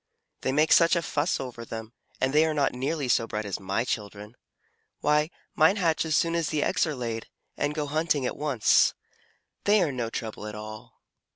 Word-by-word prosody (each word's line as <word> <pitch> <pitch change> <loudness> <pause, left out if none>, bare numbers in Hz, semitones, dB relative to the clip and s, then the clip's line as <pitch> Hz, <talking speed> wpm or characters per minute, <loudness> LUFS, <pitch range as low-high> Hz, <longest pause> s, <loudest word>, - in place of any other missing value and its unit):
"They 130 - 0
make 150 +3 +2
such 170 +1 +6
a 170 - 0
fuss 150 +4 0
over 125 -3 -6
them, 110 0 -7 0.3
and 130 +1 +1
they 155 +1 +6
are 155 - -1
not 140 -2 +1
nearly 135 +3 -2
so 115 -1 +2
bright 105 -1 -3
as 100 - -3
my 100 +4 -1
children. 105 -1 -5 0.7
Why, 150 +1 +2 0.2
mine 160 +5 +5
hatch 165 -5 +1
as 155 -1 +1
soon 165 0 +1
as 170 -2 0
the 150 -2 0
eggs 165 -3 +1
are 155 - -3
laid, 115 -3 -4 0.3
and 150 - -1
go 150 -2 -1
hunting 150 -2 0
at - - -2
once. 140 -7 +3 0.7
They 210 +1 +5
are 155 - 0
no 120 -3 -3
trouble 110 -2 -5
at 105 - -7
all." 110 +2 -10
135 Hz, 200 wpm, -27 LUFS, 115-155 Hz, 0.7 s, such